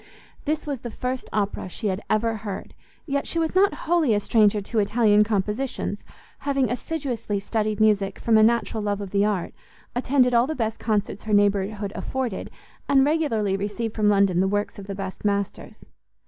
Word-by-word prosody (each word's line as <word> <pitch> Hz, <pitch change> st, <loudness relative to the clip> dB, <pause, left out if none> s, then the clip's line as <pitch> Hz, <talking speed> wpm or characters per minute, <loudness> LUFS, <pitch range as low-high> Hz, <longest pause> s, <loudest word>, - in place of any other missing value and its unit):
This 305 Hz, +1 st, -1 dB
was 285 Hz, -4 st, -3 dB
the 240 Hz, -, -6 dB
first 250 Hz, +3 st, -4 dB
Opera 200 Hz, -2 st, -2 dB
she 215 Hz, -, -7 dB
had 190 Hz, +2 st, -2 dB
ever 225 Hz, +1 st, +1 dB
heard, 205 Hz, -2 st, -6 dB, 0.3 s
yet 280 Hz, -3 st, -1 dB
she -, -, -3 dB
was 325 Hz, -1 st, 0 dB
not 390 Hz, +2 st, +4 dB
wholly 320 Hz, -9 st, +3 dB
a -, -, +2 dB
stranger 210 Hz, 0 st, +3 dB
to 215 Hz, +3 st, -2 dB
Italian 210 Hz, 0 st, +4 dB
compositions, 210 Hz, +1 st, -2 dB, 0.4 s
having 275 Hz, -4 st, 0 dB
assiduously 245 Hz, -6 st, -3 dB
studied 215 Hz, +1 st, -1 dB
music 205 Hz, -3 st, +2 dB
from 230 Hz, -, +2 dB
a 220 Hz, -, +7 dB
natural 225 Hz, 0 st, +2 dB
love 205 Hz, -1 st, -1 dB
of 200 Hz, -2 st, -6 dB
the 200 Hz, 0 st, +3 dB
art, 205 Hz, -5 st, -1 dB, 0.4 s
attended 250 Hz, 0 st, +2 dB
all 235 Hz, +2 st, +4 dB
the 315 Hz, -, -3 dB
best 225 Hz, -4 st, -2 dB
concerts 210 Hz, -2 st, -1 dB
her 215 Hz, -, -1 dB
neighbourhood 205 Hz, 0 st, +2 dB
afforded, 255 Hz, -6 st, -3 dB, 0.4 s
and 270 Hz, -1 st, +5 dB
regularly 235 Hz, -11 st, +1 dB
received 205 Hz, +3 st, -3 dB
from 210 Hz, -2 st, +2 dB
London 195 Hz, -3 st, +3 dB
the 190 Hz, -, +3 dB
works 205 Hz, +1 st, -2 dB
of 200 Hz, -, -9 dB
the 195 Hz, -, -4 dB
best 195 Hz, -1 st, -6 dB
masters. 200 Hz, -1 st, -2 dB
215 Hz, 180 wpm, -24 LUFS, 205-250 Hz, 0.4 s, a